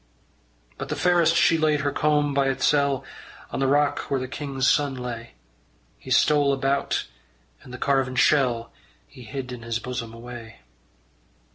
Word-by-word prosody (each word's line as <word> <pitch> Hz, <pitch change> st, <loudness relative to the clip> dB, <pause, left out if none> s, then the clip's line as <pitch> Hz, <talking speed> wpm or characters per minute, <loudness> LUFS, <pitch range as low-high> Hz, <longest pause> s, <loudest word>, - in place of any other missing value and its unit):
But -, -, -5 dB
the -, -, -1 dB
fairest 170 Hz, -2 st, +3 dB
she 165 Hz, -, +4 dB
laid 155 Hz, -2 st, +2 dB
her 145 Hz, 0 st, 0 dB
comb 150 Hz, 0 st, +1 dB
by 140 Hz, 0 st, +2 dB
itsel' 140 Hz, 0 st, +1 dB, 0.5 s
On -, -, -3 dB
the 135 Hz, -, +2 dB
rock 145 Hz, +1 st, +2 dB
where 135 Hz, -, 0 dB
the 130 Hz, -, -4 dB
king's 135 Hz, -1 st, -2 dB
son 145 Hz, -2 st, +2 dB
lay. 120 Hz, -2 st, -7 dB, 0.6 s
He -, -, -12 dB
stole 140 Hz, +2 st, +4 dB
about, 135 Hz, +1 st, 0 dB, 0.6 s
and -, -, -14 dB
the 125 Hz, -, -7 dB
carven 135 Hz, -1 st, 0 dB
shell 125 Hz, -4 st, +2 dB, 0.3 s
He 125 Hz, -, -15 dB
hid 125 Hz, +3 st, -6 dB
in 125 Hz, -1 st, -7 dB
his 115 Hz, 0 st, -2 dB
bosom 120 Hz, -2 st, -5 dB
away. 115 Hz, -, -10 dB
135 Hz, 155 wpm, -24 LUFS, 125-145 Hz, 0.6 s, she